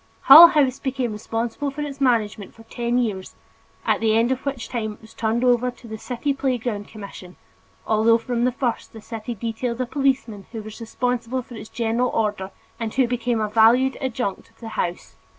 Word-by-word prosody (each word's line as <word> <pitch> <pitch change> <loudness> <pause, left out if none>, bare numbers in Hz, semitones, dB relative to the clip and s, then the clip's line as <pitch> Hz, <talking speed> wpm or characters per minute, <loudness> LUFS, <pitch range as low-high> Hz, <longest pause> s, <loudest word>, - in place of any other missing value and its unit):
Hull 320 +5 +11
House 275 -5 +1
became 260 -3 -2
responsible 225 +6 -3
for 280 +2 -6
its 280 -2 -6
management 220 -6 0
for 225 - -15
ten 235 +1 -2
years, 210 -6 -2 0.5
at - - +2
the 220 -1 +3
end 235 +2 +2
of 260 0 -2
which 270 -4 -3
time 220 -3 -3
it - - -19
was 220 0 -16
turned 230 +2 -1
over 250 0 +3
to 245 -1 -12
the 220 -1 -7
City 255 +5 -2
Playground 245 -6 -2
Commission 200 -4 -11 0.5
although 225 +1 +4
from 235 0 -2
the 250 - +2
first 245 -2 -3
the 220 - -9
city 225 +2 -6
detailed 230 +3 -4
a 255 - 0
policeman 255 -7 -1
who 220 -2 -5
was 215 +2 -10
responsible 245 +2 -2
for 245 - -14
its 220 -1 -9
general 235 +2 0
order 210 -3 -1 0.3
and 225 -2 -3
who 265 -2 +3
became 240 -1 -1
a 215 - 0
valued 230 +5 +4
adjunct 245 -6 -3
of - - -30
the 225 - -8
House. 175 -5 -4
235 Hz, 195 wpm, -22 LUFS, 220-255 Hz, 0.5 s, Hull